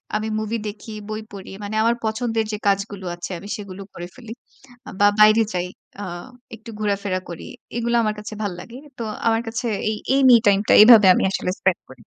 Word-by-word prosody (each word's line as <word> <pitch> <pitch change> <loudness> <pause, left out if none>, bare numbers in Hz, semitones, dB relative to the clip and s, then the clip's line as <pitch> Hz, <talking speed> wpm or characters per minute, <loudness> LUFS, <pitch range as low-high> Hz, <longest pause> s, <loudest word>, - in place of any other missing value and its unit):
আমি 215 +1 -1
মুভি 215 +2 -2
দেখি, 215 +1 -8 0.2
বই 215 0 -4
পড়ি। 195 -1 -10
মানে 210 +2 -5
আমার 235 +1 +2
পছন্দের 225 0 -1
যে 210 - -3
কাজগুলো 200 -1 -1
আছে 175 +2 -7
আমি 200 +3 -11
সেগুলো 200 -1 -9
করে 175 0 -7
ফেলি। 230 -3 -9 0.7
বা 205 - +6
বাইরে 215 +1 +7
যাই 180 0 -2 0.3
আ - - -4 0.5
একটু 220 +1 -14
ঘোরাফেরা 200 -2 -1
করি। 170 - -8 0.3
এগুলো 235 0 0
আমার 215 0 -1
কাছে 210 +1 -8
ভাল 200 - -2
লাগে। 235 +7 -10 0.2
তো 235 - -4 0.2
আমার 225 0 +2
কাছে 225 +2 -3 0.2
এই 215 - -1 0.2
এই 275 - +3
মি 240 - +9
টাইম 200 -1 +5
টা - - +6
এভাবে 220 -4 +8
আমি - - 0
আসলে 180 - -2
স্পেন্ড 185 -2 +1
করি। 130 - -14
215 Hz, 200 wpm, -22 LUFS, 195-225 Hz, 0.7 s, মি